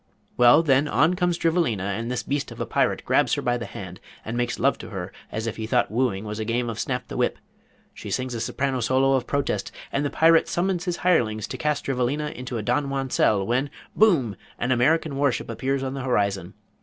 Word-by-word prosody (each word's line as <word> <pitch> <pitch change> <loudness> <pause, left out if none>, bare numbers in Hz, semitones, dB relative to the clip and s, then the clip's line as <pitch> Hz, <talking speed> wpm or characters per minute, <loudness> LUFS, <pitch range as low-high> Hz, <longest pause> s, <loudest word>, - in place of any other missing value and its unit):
Well, 125 +6 +6
then 140 -1 +3
on 160 +3 +3
comes 175 -1 0
Drivelina 165 - +1
and 105 +4 -3
this 125 -1 -2
beast 140 0 -2
of - - -10
a - - -1
Pirate - - 0
grabs - - +3
her - - -3
by 120 0 +1
the 115 - -5
hand 90 -2 -8 0.3
and 110 - -4
makes 120 0 -1
love - - +2
to - - -8
her - - -6 0.2
as 110 +1 -3
if 115 0 -4
he 110 -1 -4
thought 120 -1 +1
wooing 110 -4 0
was 105 +1 -5
a - - -1
game 120 +1 -1
of 115 - -7
snap 125 -1 -2
the - - -7
whip. - - +1 0.6
She - - -9
sings 130 -1 -2
a 115 - -3
soprano 130 +2 -1
solo 130 +3 +2
of 130 -2 0
protest 140 -1 -1 0.2
and 140 - 0
the 145 - 0
Pirate 165 +2 +4
summons 180 0 -1
his 175 -2 -1
hirelings 110 - +2
to - - -4
cast 150 -2 -1
Drivelina 135 +3 -1
into 125 -1 -5
a 110 - -3
Donjuan 135 +1 -1
cell 100 -2 +2
when, 130 +6 0 0.3
boom! 155 - +3 0.2
an 125 - -1
American 140 +4 +2
warship 140 -4 0
appears 135 +3 -1
on 130 0 -3
the 135 - -4
horizon. 100 -7 -1
130 Hz, 220 wpm, -24 LUFS, 115-145 Hz, 0.6 s, Well